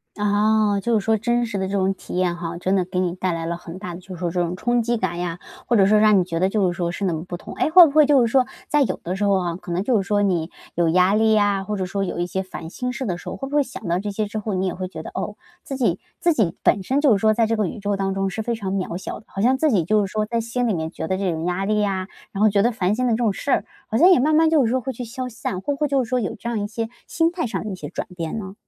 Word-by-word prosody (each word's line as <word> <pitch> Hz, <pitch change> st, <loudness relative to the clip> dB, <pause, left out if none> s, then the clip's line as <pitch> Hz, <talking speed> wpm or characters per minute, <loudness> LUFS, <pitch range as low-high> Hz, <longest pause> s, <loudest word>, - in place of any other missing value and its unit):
啊， 210 Hz, 0 st, +2 dB
就 235 Hz, +4 st, -1 dB
是 -, -, -6 dB
说 220 Hz, +1 st, +2 dB
真 240 Hz, +2 st, +1 dB
实 215 Hz, -3 st, -4 dB
的 190 Hz, 0 st, -1 dB
这 195 Hz, -, -5 dB
种 190 Hz, -1 st, +2 dB
体 -, -, -10 dB
验 180 Hz, -1 st, +1 dB
哈， 170 Hz, -1 st, -5 dB
真 185 Hz, +2 st, +1 dB
的 185 Hz, -2 st, +1 dB
给 180 Hz, 0 st, -3 dB
你 180 Hz, -1 st, 0 dB
带 185 Hz, 0 st, -1 dB
来 165 Hz, 0 st, -3 dB
了 170 Hz, 0 st, -2 dB
很 175 Hz, +1 st, -9 dB
大 180 Hz, -4 st, -6 dB
的 -, -, -9 dB
就 185 Hz, -, -20 dB
是 175 Hz, -, -9 dB
说 175 Hz, -1 st, -1 dB
这 180 Hz, +2 st, -2 dB
种 175 Hz, 0 st, -1 dB
冲 240 Hz, +5 st, +1 dB
击 240 Hz, +1 st, 0 dB
感 190 Hz, -5 st, -2 dB
呀， 175 Hz, -1 st, -3 dB, 0.3 s
或 240 Hz, -, +3 dB
者 195 Hz, -3 st, +5 dB
说 215 Hz, +1 st, +5 dB
让 210 Hz, -2 st, +5 dB
你 -, -, +2 dB
觉 170 Hz, -2 st, -3 dB
得 185 Hz, +2 st, +2 dB
就 195 Hz, -3 st, +1 dB
是 175 Hz, -, -8 dB
说 170 Hz, -2 st, -1 dB
是 200 Hz, -, -5 dB
那 180 Hz, -, +1 dB
么 160 Hz, 0 st, -4 dB
不 180 Hz, -, -5 dB
同。 175 Hz, -, -9 dB
哎， 310 Hz, -, 0 dB
会 360 Hz, +2 st, +10 dB
不 -, -, -3 dB
会 305 Hz, -1 st, +6 dB
就 285 Hz, -2 st, +5 dB
是 235 Hz, -, +3 dB
说， 260 Hz, -1 st, +4 dB, 0.2 s
在 295 Hz, -1 st, +3 dB
有 -, -, -2 dB
的 180 Hz, +2 st, -3 dB
时 200 Hz, -, -2 dB
候 200 Hz, -2 st, +3 dB
哈， 175 Hz, -2 st, -2 dB
可 175 Hz, -, -8 dB
能 175 Hz, +2 st, 0 dB
就 230 Hz, 0 st, +2 dB
是 195 Hz, -, -4 dB
说 205 Hz, -2 st, +2 dB
你 180 Hz, -4 st, 0 dB, 0.2 s
有 170 Hz, 0 st, +2 dB
压 185 Hz, +4 st, +4 dB
力 220 Hz, 0 st, +4 dB
呀， 205 Hz, -2 st, +2 dB
或 210 Hz, +2 st, -3 dB
者 185 Hz, -1 st, -2 dB
说 195 Hz, +2 st, -2 dB
有 180 Hz, -, -3 dB
一 175 Hz, -, 0 dB
些 190 Hz, +1 st, -2 dB
烦 170 Hz, -3 st, -8 dB
心 250 Hz, +7 st, -4 dB
事 260 Hz, 0 st, -4 dB
的 180 Hz, -3 st, -2 dB
时 -, -, -13 dB
候， -, -, -4 dB
会 270 Hz, -, -5 dB
不 290 Hz, -, -3 dB
会 295 Hz, -, +4 dB
想 250 Hz, -8 st, -9 dB
到 170 Hz, +1 st, +1 dB
这 205 Hz, +2 st, -3 dB
些 210 Hz, +1 st, -2 dB
之 205 Hz, -, -5 dB
后， 215 Hz, -1 st, -3 dB
你 190 Hz, 0 st, 0 dB
也 180 Hz, -, -3 dB
会 185 Hz, 0 st, -4 dB
觉 165 Hz, -3 st, -8 dB
得， -, -, -8 dB
哦， 210 Hz, -, -3 dB, 0.3 s
自 275 Hz, -, -5 dB
己 255 Hz, -, +1 dB, 0.2 s
自 345 Hz, -, +3 dB
己 205 Hz, -, +1 dB
本 195 Hz, -, +2 dB
身 270 Hz, +8 st, +1 dB
就 290 Hz, -4 st, +5 dB
是 -, -, +3 dB
说 215 Hz, +1 st, +4 dB
在 225 Hz, 0 st, +2 dB
这 225 Hz, -, +1 dB
个 215 Hz, -, +1 dB
宇 215 Hz, -, -6 dB
宙 200 Hz, 0 st, -1 dB
当 195 Hz, 0 st, -1 dB
中 195 Hz, 0 st, -1 dB
是 220 Hz, +4 st, -4 dB
非 235 Hz, -, -1 dB
常 205 Hz, -4 st, -4 dB
渺 185 Hz, -3 st, -2 dB
小 190 Hz, -, -6 dB
的， 220 Hz, -, -21 dB
好 195 Hz, -, -5 dB
像 255 Hz, +4 st, +3 dB
自 310 Hz, +1 st, +2 dB
己 190 Hz, -7 st, +3 dB
就 210 Hz, +4 st, +2 dB
是 190 Hz, -, -8 dB
说 215 Hz, 0 st, -1 dB
在 235 Hz, +1 st, -1 dB
心 235 Hz, +2 st, -1 dB
里 215 Hz, -, +1 dB
面 160 Hz, -1 st, -3 dB
觉 160 Hz, -, -5 dB
得 190 Hz, -, 0 dB
这 190 Hz, -2 st, 0 dB
种 160 Hz, -1 st, -3 dB
压 180 Hz, +2 st, -1 dB
力 210 Hz, +1 st, +1 dB
呀， 190 Hz, -2 st, -1 dB, 0.2 s
然 195 Hz, -, -6 dB
后 -, -, +7 dB
觉 200 Hz, 0 st, +3 dB
得 235 Hz, +4 st, +3 dB
烦 195 Hz, -4 st, 0 dB
心 250 Hz, +3 st, 0 dB
的 235 Hz, -, +2 dB
这 -, -, +1 dB
种 230 Hz, -4 st, +1 dB
事 280 Hz, -, -6 dB
儿， -, -, +2 dB, 0.2 s
好 220 Hz, -, -1 dB
像 340 Hz, -, +7 dB
也 360 Hz, -, +6 dB
慢 305 Hz, +4 st, +3 dB
慢 320 Hz, +1 st, +5 dB
就 305 Hz, -4 st, +4 dB
是 225 Hz, -, +1 dB
说 260 Hz, +2 st, +1 dB
会 265 Hz, +1 st, -4 dB
去 245 Hz, -, -6 dB
消 255 Hz, +2 st, -5 dB
散， 230 Hz, -5 st, -4 dB
会 285 Hz, +10 st, -2 dB
不 -, -, -4 dB
会 300 Hz, -, +2 dB
就 275 Hz, -2 st, +1 dB
是 -, -, -7 dB
说 250 Hz, +1 st, 0 dB
有 205 Hz, -, -3 dB
这 230 Hz, -, -8 dB
样 235 Hz, -2 st, -1 dB
一 205 Hz, -, -2 dB
些 225 Hz, +1 st, -3 dB, 0.2 s
心 330 Hz, 0 st, +1 dB
态 340 Hz, -6 st, -2 dB
上 -, -, -3 dB
的 215 Hz, -, -5 dB
一 -, -, -4 dB
些 -, -, -7 dB
转 -, -, -5 dB
变 165 Hz, +2 st, -4 dB
呢？ 190 Hz, -3 st, -6 dB
205 Hz, 375 characters per minute, -22 LUFS, 185-235 Hz, 0.3 s, 会